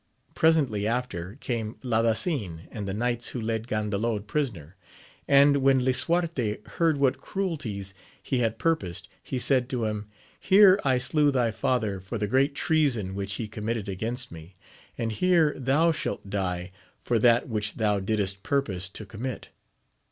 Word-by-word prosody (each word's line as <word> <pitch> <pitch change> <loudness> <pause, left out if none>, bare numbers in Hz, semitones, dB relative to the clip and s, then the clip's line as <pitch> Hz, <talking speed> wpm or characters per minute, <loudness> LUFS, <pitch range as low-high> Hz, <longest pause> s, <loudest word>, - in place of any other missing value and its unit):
Presently 135 -11 +2
after 110 -6 -3
came 115 -2 -3
Ladasin, 115 - 0
and 105 -3 -5
the 95 - -2
knights 120 +1 -1
who 125 - -4
led 110 0 -2
Gandalod 105 0 -1
prisoner; 105 - -3 0.5
and 140 0 +6
when 135 -2 +3
Lisuarte 130 -4 0 0.2
heard 165 -3 +3
what 140 -1 +1
cruelties 140 - -3 0.3
he 130 - -2
had 115 -2 0
pur 165 +6 +3
posed, 90 - -8
he 130 - -4
said 125 0 +2
to 125 -4 -1
him, 105 -1 -3 0.3
Here 195 0 +6
I 130 -2 +3
slew 145 +4 +2
thy 125 -4 +1
father 110 -3 -1
for 95 +5 -5
the 105 - -1
great 135 +6 +2
treason 140 - +1
which 100 0 -3
he 110 +2 -3
committed 110 0 -3
against 115 +6 -3
me, 85 +3 -11 0.4
and 115 -1 -2
here 165 +3 +3
thou 145 +6 +2
shalt 150 - -4
die 90 -2 -2 0.3
for 120 -2 +1
that 120 +1 +4
which 110 -3 -1
thou 105 -2 +1
didst 100 -1 -1
purpose 95 -10 -1
to 105 +2 -8
commit. 115 +4 -6
115 Hz, 155 wpm, -27 LUFS, 105-135 Hz, 0.5 s, and